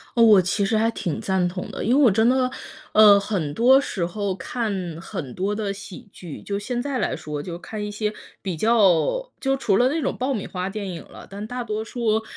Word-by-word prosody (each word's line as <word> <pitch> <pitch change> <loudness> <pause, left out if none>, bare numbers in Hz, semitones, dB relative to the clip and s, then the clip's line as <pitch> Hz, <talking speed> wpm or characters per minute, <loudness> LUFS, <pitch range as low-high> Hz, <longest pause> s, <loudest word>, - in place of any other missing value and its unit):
哦， 230 - +5
我 210 -4 +7
其 195 +3 0
实 220 +1 +1
还 225 +1 +2
挺 175 -9 -3
赞 190 -2 +1
同 180 +1 -5
的。 - - -5
因 240 +5 +2
为 295 - +4
我 240 - +7
真 220 +4 +3
的， 255 0 +3 0.4
呃， 210 -2 +8
很 180 -8 -2
多 255 - +6
时 185 -10 -2
候 200 +2 -2
看 225 0 -3 0.3
很 165 - -6
多 195 +3 -1
的 205 -2 -2
喜 200 0 -10
剧， 170 -5 -9
就 200 -1 -3
现 240 +4 -3
在 275 -1 -2
来 - - -1
说 150 -1 -5
就 170 +1 -6
看 210 +4 -6
一 210 - -4
些 210 0 -2 0.3
比 185 -4 -3
较 225 - +3
就 270 0 +1
除 200 -7 +1
了 250 - +4
那 320 +2 -1
种 - - -1
爆 265 +2 -1
米 210 - -4
花 185 +1 -4
电 205 -1 -5
影 170 - -6
了， - - -13
但 200 +2 -6
大 245 +2 -4
多 215 -1 -3
数 220 -2 -1
210 Hz, 250 characters per minute, -23 LUFS, 190-235 Hz, 0.4 s, 呃